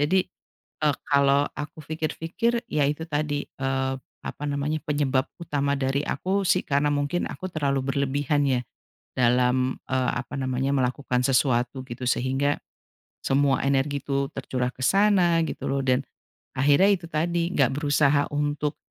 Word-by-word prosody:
Jadi, 180 +6 +3 0.6
eee, 150 -2 +3
kalau 140 0 +4
aku 150 +1 -6
pikir-pikir 165 +10 -2
iya 150 - +1
itu 150 +4 -1
tadi, 145 -1 -2
eee, 135 0 -2 0.3
apa 145 - -6
namanya, 145 +2 -1
penyebab 140 -3 0
utama 140 -4 -1
dari 135 +1 0
aku 190 +8 -1
sih 185 0 +2
karena 145 +1 +2
mungkin 145 +4 0
aku 185 - -6
terlalu 140 -6 0 0.2
berlebihan 145 +1 +1
ya 130 -3 +2 0.5
dalam, 125 +1 +2
eee, 130 -1 0
apa 120 +3 -5
namanya, 130 +1 -1
melakukan 130 -1 0
sesuatu 130 0 +1
gitu 125 0 -5
sehingga 135 +3 +1 0.6
semua 135 0 +2
energi 140 +1 +1
itu 140 0 -1
tercurah 125 -2 -2
ke 130 - -17
sana 185 -1 +4
gitu - - -4
loh 135 0 0
dan 130 0 +3 0.5
akhirnya 145 +9 +4
itu 175 -3 -3
tadi 170 +2 0
nggak 135 -4 +3
berusaha 145 -1 +3
untuk, 145 0 -1
140 Hz, 145 wpm, -25 LUFS, 135-150 Hz, 0.6 s, kalau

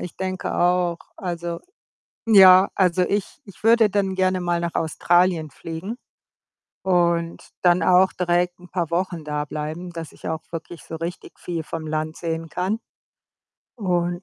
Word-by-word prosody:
ich 180 - -7
denke 185 -1 -3
auch. 175 -1 +2 0.2
Also 170 -3 -4 0.7
ja, 190 -3 +8
also, 185 -2 +2
ich 200 +8 -1
ich 200 - -15
würde 225 -1 +5
dann 195 -1 0
gerne 185 0 +1
mal 175 -1 0
nach 170 0 -3
Australien 170 0 +2
fliegen 165 - -7 0.9
und 170 -2 +1 0.2
dann 175 0 +4
auch 185 +1 +5
direkt 175 0 0
'n 180 - -14
paar 175 -3 -2
Wochen 175 -2 -2
da 150 0 -3
bleiben, 155 +4 -5
dass 165 -2 -7
ich - - -8
auch 160 -1 -3
wirklich 165 0 -7
so 165 - -6
richtig 170 +2 -7
viel 170 -2 -4
vom 160 +1 -6
Land 155 +1 -3
sehen 165 -1 -3
kann. 190 +7 -1 1.0
Und, 175 -4 -1
175 Hz, 150 wpm, -23 LUFS, 165-185 Hz, 1.0 s, ja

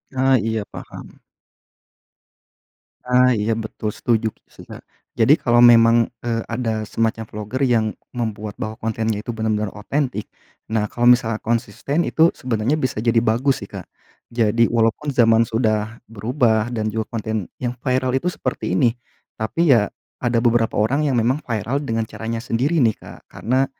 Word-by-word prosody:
Ah, 130 0 +3
iya 110 0 -2
paham. - - -11 1.9
Ah, 125 0 +4
iya 105 +2 0
betul, 110 -1 -4
setuju 115 -2 0
ki - - -38
sih - - -14
Kak. - - -11 0.4
Jadi 120 +5 +5
kalau 120 -1 +4
memang, 115 -1 +6
eee, 115 -1 -1
ada 115 -2 -2
semacam 115 +1 -1
vlogger 105 +5 -6
yang 115 -3 +2 0.3
membuat 110 -3 -4
bahwa 110 0 -4
kontennya 110 -1 -2
itu 120 - -3
benar-benar 110 -2 -1
otentik, 125 +1 -3 0.4
nah 110 -1 0
kalau 120 0 +3
misalnya 115 -3 +3
konsisten 120 +8 -1
itu 165 +1 +4
sebenarnya 125 +3 -1
bisa 130 -7 -2
jadi 115 0 +1
bagus 120 +5 +1
sih - - -19
Kak. - - -8 0.4
Jadi 115 0 +2
walaupun 115 +5 +1
zaman 115 -2 +4
sudah 110 -1 -1
berubah 115 0 0
dan 110 -3 -2
juga 110 -1 -2
konten 110 -3 -3
yang 120 -1 -1
viral 130 -1 0
itu 135 +7 0
seperti - - -3
ini. 120 -6 +3 0.4
Tapi 145 +8 +1
ya, 105 -4 +3 0.3
ada 120 -1 +1
beberapa 115 -1 +2
orang 135 +8 +1
yang 135 -4 +1
memang 120 +5 +1
viral 115 +3 -2
dengan 115 -5 -1
caranya 115 +1 -5
sendiri 130 +7 0
nih 110 -2 +3
Kak. - - -12
Karena, 130 +3 0
115 Hz, 155 wpm, -21 LUFS, 110-125 Hz, 1.9 s, memang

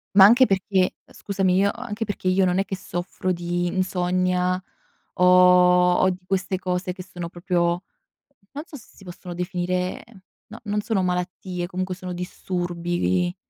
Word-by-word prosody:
Ma 195 -1 +10
anche 240 +5 +7
perché 190 -2 +1
scusami, 195 -2 -1
io 200 +2 +3
anche 230 -2 -5
perché 205 -3 -4
io 185 +1 +3
non 180 0 +2
è 195 - +1
che 195 - -4
soffro 185 0 -4
di 175 0 -2
insonnia 180 0 0 0.5
o 180 - +2 0.7
o 185 - +3
di 180 - -3
queste 190 0 -1
cose 180 0 -2
che 185 - -8
sono 175 -2 -7
proprio, 175 0 -1 0.7
non 290 +2 -5
so 320 - -12
se 235 - -16
si 195 - -17
possono 175 0 -9
definire 180 0 -2 0.4
no, 225 +2 -11
non 210 -1 -1
sono 205 -3 0
malattie 180 0 -3
comunque 185 0 -3
sono 180 0 -7
disturbi 175 -1 -4
vi 180 -1 +1
185 Hz, 160 wpm, -23 LUFS, 180-195 Hz, 0.7 s, Ma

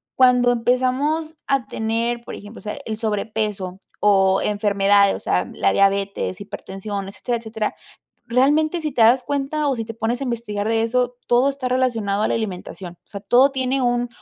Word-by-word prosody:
cuando 250 -1 +5
empezamos 260 +7 0
a 270 -5 +1
tener, 230 +2 -2
por - - -7
ejemplo, 205 +3 -11
o - - -14
sea, 210 - -5
el 220 -1 -4
sobrepeso 210 -3 -2 0.2
o 195 -2 +4
enfermedades, 200 -1 +3
o - - -6
sea, 90 +1 0
la 100 - +1
diabetes, 195 -1 +1
hipertensión, 200 0 -6
etcétera, 235 +4 -3
etcétera, 220 -1 -3 0.5
realmente 300 +7 +2
si 305 -2 -2
te 245 - +2
das 240 +3 +5
cuenta 285 +1 -1
o 270 - 0
si 225 - -3
te 225 - -6
pones 230 +3 -2
a 275 - -2
investigar 225 -4 -3
de 225 0 +2
eso, 245 +1 0
todo 245 +3 +3
está 270 -2 -4
relacionado 230 -6 0
a - - +1
la - - 0
alimentación. 185 -4 -5
O - - -38
sea, 200 - -7
todo 250 +7 +4
tiene 265 0 0
un 245 0 +1
230 Hz, 180 wpm, -21 LUFS, 205-255 Hz, 0.5 s, cuando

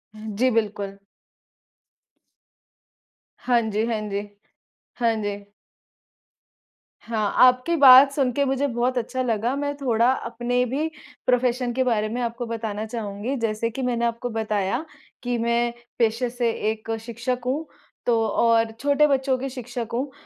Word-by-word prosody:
हुँ 215 -1 -7
जी, 255 +2 +3
बिल्कुल। 205 -3 -2 2.4
हाँ 240 -2 +2
जी, 215 +2 0
हाँ 230 -2 -1
जी। 200 - -1 0.8
हाँ 230 -1 +3
जी। 205 -1 -2 1.7
हाँ, 215 -3 -1
आपकी 255 +7 +3
बात 270 -1 +9
सुनके 275 -1 +1
मुझे 270 +1 0
बहुत 245 +1 -1
अच्छा 245 +2 -2
लगा। 235 +1 0
मैं 285 0 -2
थोड़ा 240 -3 +2
अपने 245 0 -1
भी 280 +6 -1 0.4
प्रोफ़ेशन 250 0 +1
के 260 +2 +1
बारे 215 -4 0
में 240 +3 -3
आपको 235 +1 -3
बताना 220 -2 -4
चाहूँगी। 220 +3 -4
जैसे 230 -1 -1
कि 265 +4 -6
मैंने 240 -2 0
आपको 235 +1 -2
बताया 220 +4 -1 0.4
कि 245 -1 -1
मैं 235 +1 +1 0.3
पेशे 230 +2 +1
से 240 -1 0 0.2
एक 220 +1 -6
शिक्षक 235 +2 -3
हूँ, 280 +6 -1 0.4
तो 235 -2 +3
और 230 +1 +2
छोटे 285 +1 +3
बच्चों 270 -2 +1
की 270 +2 -4
शिक्षक 245 -2 -6
हूँ। 265 +4 -2
240 Hz, 140 wpm, -24 LUFS, 225-255 Hz, 2.4 s, बात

